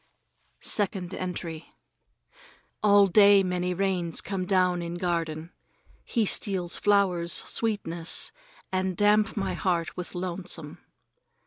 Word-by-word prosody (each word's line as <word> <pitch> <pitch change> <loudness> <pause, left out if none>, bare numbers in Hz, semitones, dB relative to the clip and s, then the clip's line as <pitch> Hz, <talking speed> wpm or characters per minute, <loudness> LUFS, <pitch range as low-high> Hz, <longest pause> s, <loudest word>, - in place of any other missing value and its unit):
Second 195 -3 -1
Entry 170 -3 -6 1.1
ALL 205 -1 +6
day 200 +1 +6
many 180 0 -1
rains 180 -3 0
come 190 -2 -3
down 180 -2 +2
in 170 0 -5
garden. 165 -2 -3 0.5
He 230 -3 0
steals 185 -3 -1
flowers' 185 -4 +2
sweetness 170 -7 0 0.4
and 185 -1 -1
damp 210 +1 +3
my 195 - -1
heart 170 -3 -1
with 180 0 -7
lonesome. 175 -4 -4
185 Hz, 105 wpm, -27 LUFS, 170-200 Hz, 1.1 s, ALL